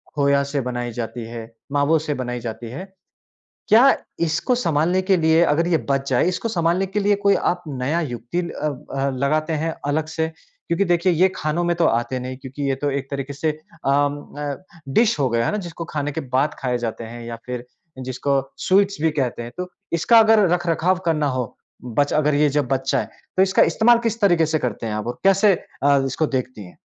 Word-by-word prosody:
खोया 140 -1 +3
से 140 - +1
बनाई 120 -1 -3
जाती 115 0 -5
है, 115 -1 -6 0.3
मावो 145 +3 +3
से 150 -1 -3
बनाई 125 0 -4
जाती 115 0 -6
है। 190 +9 -8 0.8
क्या 245 +5 +7 0.3
इसको 170 +9 +1
संभालने 175 -4 +1
के 190 0 +2
लिए 160 0 +4
अगर 165 +1 +2
ये 175 -2 +3
बच 135 0 0
जाएँ 130 +5 +2
इसको 205 +5 -3
संभालने 175 -1 +1
के 195 +3 -2
लिए 205 0 +3
कोई 200 - +6
आप 175 0 0
नया 140 +4 -1
युक्ति 125 +2 -4
अ 165 -3 -4 0.3
अ, 135 +1 +1
लगाते 155 +5 0
हैं 165 - -2
अलग 150 +2 0
से? 160 0 -2 0.4
क्योंकि 170 +4 +1
देखिए 175 +1 +3
ये 180 +3 +4
खानों 155 +3 -1
में 175 0 +1
तो 170 - +3
आते 120 +3 0
नहीं 130 +1 -6
क्योंकि 135 +2 -7
ये 135 - +1
तो 145 +2 -2
एक 135 -1 -3
तरीके 140 0 -4
से 150 +3 -1 0.4
अ, - - +2
उम, 145 +1 0
अ, 145 +4 -4 0.3
डिश 220 - +3
हो 135 -2 +2
गया 115 0 +1
है - - +1
ना, 210 - -1
जिसको 170 -4 -6
खाने 145 -1 -2
के 160 - -4
बाद 135 +2 0
खाए 125 -2 -1
जाते 115 -1 -4
हैं 120 +1 -8
या 115 0 -5
फिर 125 -1 -5 0.4
जिसको 135 +2 0 0.3
स्वीट्स 200 +1 +3
भी 160 0 +2
कहते 130 -5 -2
हैं। 120 - -8
तो 180 0 -4 0.2
इसका 225 +8 +5
अगर 220 0 +6
रख-रखाव 175 +1 +1
करना 155 -3 +1
हो 125 - 0 0.5
बच 145 0 +2
अगर 150 -1 +2
ये 150 +1 +4
जब 145 -1 0
बच 135 0 0
जाएँ, - - 0 0.3
तो 190 - +6
इसका 190 0 +3
इस्तेमाल 235 +1 +5
किस 230 +1 -2
तरीके 175 -5 +4
से 155 0 0
करते 115 -4 -3
हैं 110 - -3
आप? 105 +1 -3
और 120 - -4
कैसे 195 +1 +5 0.3
अ, 140 0 +5
इसको 135 +4 0
देखती 130 -6 -3
हैं? 90 - -15
145 Hz, 215 wpm, -22 LUFS, 130-175 Hz, 0.8 s, क्या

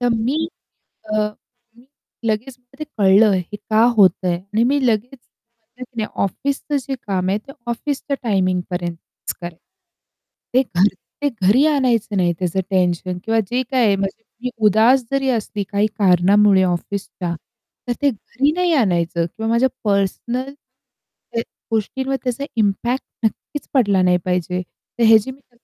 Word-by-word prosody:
तर 245 - +2
मी 270 +9 0 0.7
अ, 215 - +2 0.6
मी 240 +2 -20 0.4
लगेच 225 +4 -1
मला 250 +2 -25
ते 305 - -4
कळलं 200 +2 +6
हे 185 +2 -3
का 215 +1 +1
होतंय 185 -2 +4
आणि 200 +5 -2
मी 280 +3 +2
लगेच 240 +4 0 0.4
म्हटलं 235 +3 -12
की 245 -1 -28
नाही 215 -1 -1
ऑफिसचं 280 - -2
जे 270 +1 -4
काम 185 -2 -1
आहे, 200 - +1
ते 275 +6 -13 0.2
ऑफिसच्या 280 +3 -2
टायमिंगपर्यंतच 180 -5 -2
करेल. 175 -1 -7 1.0
ते 255 - +5 0.2
घरी 200 +3 +4 0.3
ते 290 - +2 0.2
घरी 255 +9 +5
आणायचं 240 -8 +1
नाही 175 -2 +2
त्याचं 180 0 -1
टेन्शन. 180 -1 0
किंवा 225 0 +1
जे 250 +1 +1
काही 235 -6 +3
म्हणजे 195 +3 -4 0.2
मी 250 - 0 0.2
उदास 225 +6 +5
जरी 275 -1 +1
असली 215 -4 -1
काही 205 +1 +2
कारणामुळे 195 +1 +5
ऑफिसच्या, 180 0 -3 0.5
तर 245 - +1
ते 285 - +4
घरी 265 +5 -1
नाही 360 -1 +2
आणायचं 170 - +1
किंवा 220 +6 -4
माझ्या 240 +3 +3
पर्सनल 225 +6 -1 0.6
त्या 230 - -5 0.3
गोष्टींवर 265 +5 -1
त्याचा 255 +2 -2
इम्पॅक्ट 230 +4 0 0.2
नक्कीच 285 +6 -3
पडला 205 -8 +3
नाही 180 -1 +4
पाहिजे. 180 0 -1
तर 230 +6 -7
ह्याची 220 +2 +5
मी 260 - -13
नक्की 245 -3 -34
220 Hz, 150 wpm, -20 LUFS, 190-255 Hz, 1.0 s, कळलं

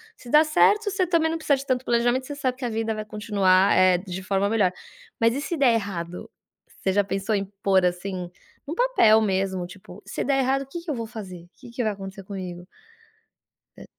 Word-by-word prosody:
se 245 - -13
dá 305 +1 +6
certo 410 +7 +3
você 380 -2 0
também 330 -2 +2
não 325 - -2
precisa 290 -3 +1
de 275 - -7
tanto 255 -1 0
planejamento, 240 +2 +1
você 290 - -6
sabe 260 -3 -1
que 260 - -9
a - - -1
vida 225 0 -2
vai 215 - -4
continuar, 200 -3 +2
eh, 185 -1 +5
de 185 0 -7
forma 195 0 0
melhor. 205 -5 +2 0.5
Mas 230 0 +3
e 280 - -2
se 315 +4 -3
der 265 -5 +4
errado, 180 -5 -4 0.5
você 190 - 0
já 205 0 +3
pensou 195 +2 -2
em 200 - 0 0.2
pôr 190 -2 +3
assim 180 0 -3 0.3
num 295 - -4
papel 480 - +4
mesmo 190 -3 -1
tipo: 185 +1 -13
"Se - - -4
der 270 0 +1
errado, 270 +1 +1
o - - -6
que 345 - -6
que 335 - -10
eu - - -2
vou 230 -2 -4
fazer, 185 -6 -9
que 250 - -12
que 240 +1 -3
vai 215 - +1
acontecer 195 0 -9
comigo?" 185 -3 -7 1.1
É - - -10
215 Hz, 220 wpm, -24 LUFS, 190-270 Hz, 1.1 s, dá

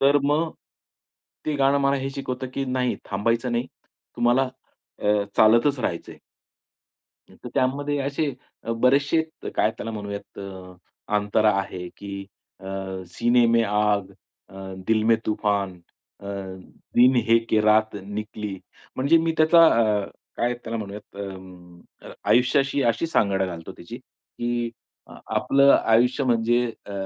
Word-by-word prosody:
तर 140 +1 +5
मग, 155 +3 +1 1.0
ते 155 - 0
गाणं 140 +1 +3
मला 140 0 +2
हे 135 0 -3
शिकवतं 130 -1 -4
की 135 - -1
नाही, 130 -1 -1
थांबायचं 115 +5 0
नाही. 120 +2 -1 0.5
तुम्हाला 125 +2 +3 0.5
अ, - - -2 0.3
चालतच 120 +6 +5
राहायचंय. 85 -7 -4 1.1
हं, - - -17
तर - - -5
त्यामध्ये 145 +3 0
असे 140 +2 -1 0.3
अ, - - -5
बरेचशे 140 +7 +3 0.2
अ, - - -5
काय 110 - +3
त्याला 115 - -5
म्हणूयात 100 -2 -7
अ, 95 -2 -9 0.4
अंतरा 105 +1 +2
आहे 90 -2 -6
की 100 -1 -7 0.4
अ, - - -14 0.5
सीने 120 +4 +3
में 115 0 +4
आग, 105 -2 +1 0.4
अ, 95 - -17 0.3
दिल 110 -1 +2
में 115 - +6
तूफान, 100 -3 0 0.5
अ, 100 - -10 0.7
दिन 125 +2 +6
है 115 0 +6
के 110 - +4
रात 110 0 +3
निकली. 105 0 -5 0.4
म्हणजे 140 +6 +4
मी 165 0 0
त्याचा 165 +1 +6
अ, 110 -6 +3 0.3
काय 120 +1 0
त्याला 115 0 -3
म्हणूयात 105 -1 -8
अं, 95 -3 -9 0.3
अ, - - -9 0.2
आयुष्याशी 135 +4 +3
अशी 165 - -3
सांगड 100 -10 +1
घालतो 85 -3 -5
त्याची 115 +8 -10
की 120 -2 -5 0.4
अ, - - -14 0.2
आपलं 140 0 +5
आयुष्य 125 +5 +3
म्हणजे 120 0 +2 0.2
अ, 100 - -8
115 Hz, 140 wpm, -24 LUFS, 105-135 Hz, 1.1 s, में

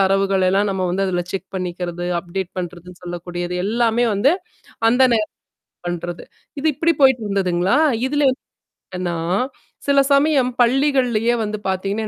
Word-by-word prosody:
தரவுகள் 195 0 +2
எல்லாம் 200 +2 +2
நம்ம 185 -1 -1
வந்து 195 +2 0
அதுல 175 -1 -1
செக் 190 -1 -4
பண்ணிக்கிறது, 175 -1 -4
அப்டேட் 180 +1 -5
பண்றதுன்னு 175 0 -7
சொல்லக்கூடியது. 175 0 -5
எல்லாமே 235 +1 +2
வந்து 240 +9 +3 0.6
அந்த 250 +2 +3
நேரம் 215 -1 -1 0.6
பண்றது. 175 0 -5 0.4
இது 315 - -1
இப்படி 335 0 +2
போயிட்டு 260 -4 +5
இருந்ததுங்களா? 190 +2 +1 0.3
இதுல 290 0 +1
வந்து 255 - -7 0.5
என்னனா, 175 -2 -2 0.7
சில 280 0 +4
சமயம் 280 -3 +3
பள்ளிகள்லயே 245 -3 +2
வந்து 210 0 -4
பாத்தீங்கன்னா, 200 +3 -2
195 Hz, 135 wpm, -20 LUFS, 180-245 Hz, 0.7 s, போயிட்டு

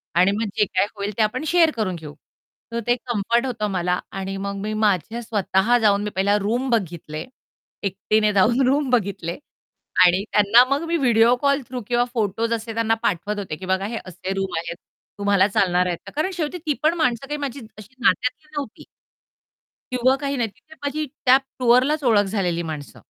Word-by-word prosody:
आणि 185 +3 +5
मग 220 +2 -1
जे 210 - +4
काही 190 +1 0
होईल 200 +1 -3
ते 220 - +4
आपण 250 +7 -1
शेअर 330 -1 +4
करून 185 -5 -1
घेऊ. 150 -3 -9 0.6
तर 235 - -2
ते 240 - +4
कम्फर्ट 235 +2 0
होतं 230 -5 -2
मला 180 -1 0
आणि 195 0 -4
मग 200 - -3
मी 215 +1 -3
माझ्या 215 +1 0
स्वतः 215 +1 +1
जाऊन 205 -1 +3
मी 210 - -2
पहिला 200 +2 +2
रूम 240 +6 -1
बघितले 170 -8 -2 0.6
एकटीने 210 +2 +1
जाऊन 230 +7 +3
रूम 280 0 +2
बघितले 200 -8 -1 0.7
आणि 180 +3 +3
त्यांना 210 +4 +6
मग 280 +4 0
मी 340 - 0
व्हिडिओ 240 -4 +4
कॉल 280 0 +2
थ्रू 250 -1 -5
किंवा 240 0 +2
फोटोस 225 0 -1
असे 225 0 -4
त्यांना 225 0 +1
पाठवत 205 +3 -1
होते, 180 -6 -4
की 185 - -9
बघा 190 +1 0
हे 225 +2 -4
असे 185 +1 -5
रूम 195 -2 -3
आहेत 170 +1 -4 0.4
तुम्हाला 200 -1 +3
चालणार 180 -3 +2
आहेत 175 - -2
का? - - -9
कारण 315 +6 0
शेवटी 330 0 -3
ती 300 - +2
पण 315 +2 +4
माणसं 250 -3 0
काही 295 0 -3
माझी 280 -2 -4 0.2
अशी 215 +5 -13
नात्यातली 250 +5 +1
नव्हती. 280 -7 -5 1.1
किंवा 255 +1 +3
काही 280 -1 -2
नाही 235 -3 0
तिथे 315 +10 -19
माझी 300 +2 -2 0.2
त्या 255 +1 +8 0.2
टूअरलाच 255 +5 +3
ओळख 215 -4 +4
झालेली 180 -4 -1
माणसं. 145 -5 -9
215 Hz, 185 wpm, -22 LUFS, 195-250 Hz, 1.1 s, त्या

